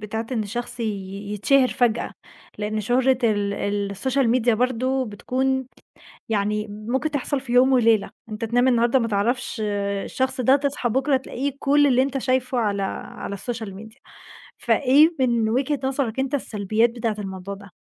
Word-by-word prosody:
بتاعة 220 +2 -4
إن 225 -3 0
الشخص 240 +3 -5
ي 230 - -1 0.5
يتشهر 255 +6 +3
فجأة؟ 235 -2 0 0.5
لأن 215 +1 -2
شهرة 255 +4 +2
ال 205 -2 +1
ال 200 0 -2
الSocial 265 +3 +1
media 240 +1 +2
برضه 255 +3 0
بتكون 260 +5 -1 0.6
يعني 210 0 0
ممكن 240 +9 -2
تحصل 285 0 -1
في 260 -2 -6
يوم 255 +2 +5
وليلة. 230 -4 +3 0.2
أنت 215 +1 -5
تنام 245 +3 +2
النهارده 240 +1 +3
ما 230 -1 -1
تعرفش 220 +2 -1 0.4
الشخص 260 0 -1
ده، 260 +3 +5
تصحى 280 -3 -1
بُكرة 265 +4 +2
تلاقيه 265 +1 -3
كل 290 +1 +3
اللي 255 -1 +4
أنت 275 0 -1
شايفه 255 -1 0
على 205 -3 0 0.3
على 200 - -5
الSocial 220 0 -5
media 220 +5 -12 0.6
فإيه 290 +5 +4
من 235 -4 +2
وجهة 270 +4 0
نظرك 265 -3 -1
أنت 270 +2 0
السلبيات 215 -2 0
بتاعة 230 -2 -2
الموضوع 190 -1 -6
ده؟ 200 0 -13
240 Hz, 160 wpm, -23 LUFS, 215-265 Hz, 0.6 s, يوم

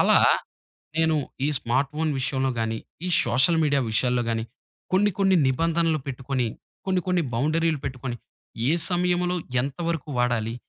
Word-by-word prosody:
అలా - - +5 0.8
నేను 160 -1 +3 0.3
ఈ - - +1
స్మార్ట్ 130 +4 0
ఫోన్ 160 0 0
విషయంలో 130 0 0
గాని 110 0 -1 0.3
ఈ - - -1
సోషల్ 130 +8 +3
మీడియా 145 -2 +2
విషయాల్లో 125 +2 +1
గాని 115 -1 -1 0.5
కొన్ని 205 +2 +4
కొన్ని 195 -2 +4
నిబంధనలు 165 +3 +1
పెట్టుకొని 130 -1 -2 0.4
కొన్ని 185 -1 +2
కొన్ని 180 -2 +2
బౌండరీలు 155 +5 +1
పెట్టుకొని 130 -2 -4 0.5
ఏ - - +4 0.2
సమయంలో 180 0 +1 0.3
ఎంతవరకు 165 +2 -3
వాడాలి? 120 -2 0
145 Hz, 135 wpm, -25 LUFS, 125-170 Hz, 0.8 s, అలా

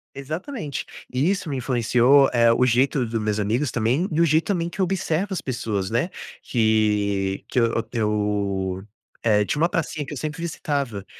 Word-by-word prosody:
Exatamente, 155 - -5 0.3
e 135 +8 +2
isso 195 -3 -1
me 135 - -2
influenciou, 125 +2 +4
eh, 115 -1 +5
o 125 +2 +3
jeito 130 +1 +2
dos 115 0 -2
meus 105 0 -1
amigos 115 +7 0
também, 125 +11 0
e 155 - 0
o 170 - +5
jeito 160 +1 +2
também 170 -4 0
que 190 - -4
eu - - +4
observo 190 +1 -1
as 185 - -3
pessoas, 110 -7 -3
né, 120 +10 0 0.3
que 105 -4 +1
que 125 - 0
eu 115 -1 +1
eu, 100 -4 -1 0.4
eh, 105 -2 +3
tinha 150 +8 -1
uma 170 - +4
pracinha 155 -4 -2
que - - -7
eu 145 - -6
sempre 155 +2 -4
visitava 140 - -3
125 Hz, 180 wpm, -23 LUFS, 105-155 Hz, 0.4 s, eh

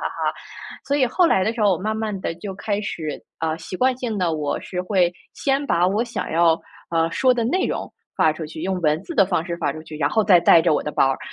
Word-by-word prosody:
哈。 - - -3 0.7
所 285 - 0
以 260 -3 +3
后 335 +8 +3
来 190 - +3
的 220 - 0
时 230 - -6
候 200 -2 +5
我 175 - -1
慢 215 +3 -2
慢 215 -3 -3
地 165 - -3
就 190 +3 -7
开 205 0 -2
始， 155 -7 -5 0.2
啊， 160 0 -1
习 185 - -7
惯 255 +2 +2
性 230 -5 -3
地， 175 -3 +1
我 150 -2 -2
是 180 -1 -4
会 180 -3 +2 0.2
先 275 +1 0
把 175 -9 +2
我 205 +5 +1
想 240 -1 -4
要， 165 0 +3 0.3
呃， 165 -1 +2
说 255 -1 +3
的 235 - 0
内 365 +11 +1
容 - - -4 0.2
发 155 - +4
出 155 0 -6
去， 155 +1 -8
用 185 -1 -1
文 155 +2 +1
字 340 - -7
的 195 -6 +5
方 175 -4 0
式 170 -1 -3
发 - - 0
出 155 - -8
去， 155 -1 -11
然 140 -1 +2
后 220 +6 +2
再 180 -5 +6
带 170 -1 +6
着 - - +3
我 - - +1
的 150 - -3
包 135 - +3
儿， - - -2
185 Hz, 285 characters per minute, -22 LUFS, 165-220 Hz, 0.7 s, 再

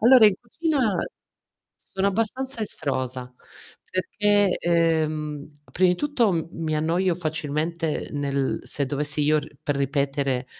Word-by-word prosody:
Allora 240 0 +8
in 205 - +4
cucina 255 - 0 0.8
sono 195 +1 -3
abbastanza 230 +5 -2
estrosa, 130 - -3 0.6
perché, 205 +1 +2
ehm, 155 -3 0
prima 185 0 +3
di - - +2
tutto 230 - +1
mi 160 -2 -2
annoio 170 +4 +1
facilmente 160 0 -2
nel 140 -2 -1
se 140 -2 -1
dovessi 150 +2 -1
io 155 +1 +4
r 150 0 -8
per 145 - -1
ripetere 140 -2 0
160 Hz, 120 wpm, -24 LUFS, 145-200 Hz, 0.8 s, Allora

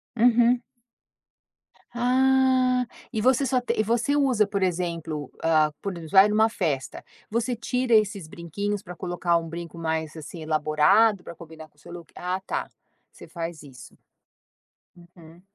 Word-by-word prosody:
Uhum. 240 +1 +4 1.3
Ah, 255 0 +3 0.3
e 220 - -2
você 260 +3 +3
só 255 0 +1
t 245 - -1
e - - +3
você 235 +6 0
usa, 260 -7 +3
por 200 -1 -3
exemplo 170 -5 -2
ah, 155 -2 +3
por 200 - -3
exemplo 160 -2 -10
vai 195 +1 +7
em - - -2
uma 220 +1 +4
festa, 150 -11 -3 0.3
você 235 +3 -1
tira 245 +2 -1
esses 205 -5 +1
brinquinhos 200 +5 -4
para 180 0 -9
colocar 175 -1 0
um 165 0 -4
brinco 170 +1 -8
mais, 160 -1 -3
assim, 160 +2 -9
elaborado 155 +7 +3
para - - -9
combinar 160 -1 -12
com 150 - -38
o - - -25
seu - - -13
look, 170 -2 -10
ah 180 +1 -3
tá, - - -3 0.4
você - - -14
faz 165 -2 -6
isso. 135 -3 -14 1.2
Uhum. 165 0 -16
185 Hz, 160 wpm, -25 LUFS, 165-235 Hz, 1.3 s, vai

